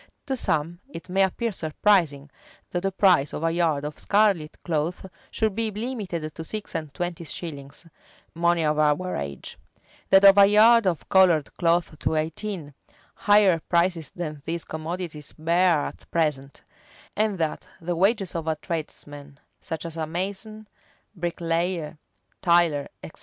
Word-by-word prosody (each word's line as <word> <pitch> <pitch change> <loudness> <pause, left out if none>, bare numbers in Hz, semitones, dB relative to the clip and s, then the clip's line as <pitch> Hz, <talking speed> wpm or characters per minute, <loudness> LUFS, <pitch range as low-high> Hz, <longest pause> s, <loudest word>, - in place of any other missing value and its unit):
To 270 -2 -1
some 170 - -1
it 180 -9 -10
may 190 +2 +2
appear 220 +5 0
surprising, 155 -4 +1 0.4
that 175 - -1
the 195 +1 -1
price 180 -7 +3
of 155 - -4
a 165 - +2
yard 160 -4 0
of 150 0 -6
scarlet 200 -7 +1
cloth 165 +2 -2 0.2
should 220 -2 0
be 225 +2 -1
limited 205 - -4
to 160 - -7
six 210 +5 -6
and 155 -4 -4
twenty 175 +3 -4
shillings, 150 -2 -7 0.5
money 170 -1 +2
of 150 0 +1
our 155 +5 +1
age; 70 -1 -6 0.5
that 195 +1 +6
of 195 0 +8
a 200 - +8
yard 220 +1 +6
of 170 -4 -1
colored 175 -6 +4
cloth 170 -3 +1
to - - 0
eighteen; 160 0 -3 0.4
higher 205 -4 +4
prices 170 -3 +1
than 155 -4 -6
these 170 0 -3
commodities 160 -1 -6
bear 170 +2 +3
at - - -7
present; 150 -4 -2 0.5
and 210 -2 0
that 160 -2 -2
the 175 0 -3
wages 195 +2 +1
of 165 -1 -4
a 160 - +1
tradesman, 145 -3 -6 0.2
such 160 -3 -6
as 165 -1 -6
a 160 -1 -2
mason, 200 +5 -5 0.5
bricklayer, 170 -2 -2 0.4
tiler, 170 -5 +3 0.2
etc. - - -10
170 Hz, 150 wpm, -25 LUFS, 155-195 Hz, 0.5 s, of